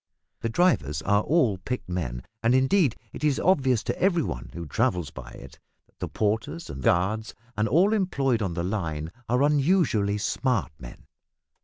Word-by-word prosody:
The 115 - -2
drivers 95 - +1
are 100 +1 +3
all 120 - +2
picked 125 +6 -4
men, 70 -10 -3 0.2
and 120 +2 +3
indeed 135 - +3 0.2
it - - -8
is 150 -3 +2
obvious 135 - +2
to - - -3
every 175 -4 +3
one 60 - -5
who 85 -1 -5
travels 100 - 0
by - - -9
it - - -12 0.3
that - - -37
the - - -3
porters, 105 -8 -2
and 65 -1 -7
guards, 100 +8 +1 0.2
and 105 +1 +1
all 190 - +4
employed 140 - +1
on 95 -5 -2
the 85 - -2
line 85 -5 -3 0.2
are 125 +3 +3
unusually 145 - +2
smart 115 - 0
men. - - -11
110 Hz, 170 wpm, -26 LUFS, 90-140 Hz, 0.3 s, all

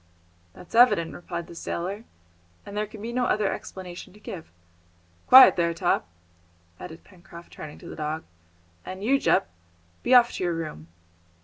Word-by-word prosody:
"That's 180 - -15
evident," 230 -9 +4
replied 170 -1 -6
the - - -12
sailor, 190 +6 -5 0.6
"and 200 - -9
there 210 0 -1
can 215 0 -11
be 235 +1 -5
no 250 0 +1
other 210 -4 +1
explanation 185 0 -9
to 210 - -17
give. 175 - -9 0.8
Quiet 260 -7 +9
there, 170 -1 +1
Top!" 175 - 0 0.7
added 160 - -10
Pencroft, 170 -2 -15
turning 150 -1 -9
to 170 - -13
the - - -8
dog, 155 +1 -4 0.6
"and 185 +1 -8
you, 270 +5 +3
Jup, 85 - +1 0.5
be 255 - +3
off 240 -1 +6
to - - -5
your 175 -1 0
room!" 155 - -6
180 Hz, 165 wpm, -25 LUFS, 170-215 Hz, 0.8 s, Quiet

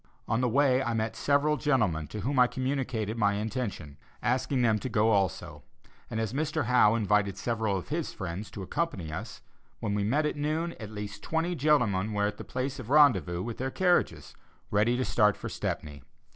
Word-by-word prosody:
On 115 - +1
the 125 - +2
way 135 +1 +3
I 120 -3 -1
met 110 0 -1
several 145 +1 +2
gentlemen 110 - +1
to 105 +8 -6
whom 135 +1 0
I 125 - +7
communicated 130 -5 -2
my 100 -2 +3
intention, 105 - -4 0.3
asking 130 +1 +1
them 110 -2 +3
to 130 - -4
go 110 0 +3
also; 100 -4 -1 0.5
and 110 - -3
as 110 0 -2
Mr. 150 0 -1
Howe 115 -3 +5
invited 105 -3 +1
several 110 -1 -1
of 90 - -7
his 160 +1 -2
friends 95 +2 -6
to 105 -2 -7
accompany 95 - -3
us, 110 +8 -7 0.4
when 100 - -2
we 105 0 0
met 140 +9 +1
at 150 - -1
noon, 155 +3 -1
at 105 -3 -7
least 105 -1 -7
twenty 165 +6 -1
gentlemen 120 - +2
were 105 0 +1
at 105 - -2
the - - -7
place 130 +2 -4
of 120 -3 -8
rendezvous 95 - +4
with 115 -1 -6
their 130 +1 -1
carriages, 180 +5 +1 0.4
ready 105 +4 +2
to 130 - 0
start 105 -3 +3
for - - -6
Stepney. 75 -1 -4
115 Hz, 195 wpm, -29 LUFS, 105-135 Hz, 0.5 s, I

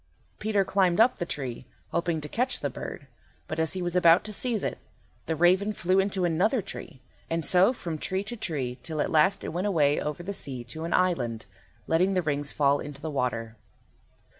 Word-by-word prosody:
Peter 210 -2 +1
climbed 185 -1 +2
up 230 +1 +5
the 175 - -2
tree, 130 -5 -5 0.2
hoping 170 -2 0
to 150 - -6
catch 245 - -1
the - - -1
bird; - - -7 0.4
but 155 - -4
as 160 -1 0
he 185 -1 -3
was 175 0 -2
about 170 -1 +6
to 215 - -6
seize 230 0 0
it, - - -3 0.5
the 160 - 0
raven 185 +6 +3
flew 185 0 +2
into 195 -1 +1
another 180 +9 +2
tree, 170 -8 -8 0.3
and 165 -1 -1
so 185 - +5
from 170 -10 -5
tree 190 +4 -2
to 230 +4 -4
tree 135 - -3
till 155 +3 -5
at - - 0
last 185 +5 +3
it - - -3
went 180 +4 -1
away 150 -7 +2
over 150 +4 -4
the 200 +3 -4
sea 130 -9 -4
to 160 +7 -6
an 170 - -4
island, 120 - 0 0.4
letting 185 +4 +2
the 185 - +1
rings 145 -2 -1
fall 140 -1 +3
into 145 -1 -7
the 155 +1 -5
water. 115 -4 -2
170 Hz, 205 wpm, -27 LUFS, 145-190 Hz, 0.5 s, about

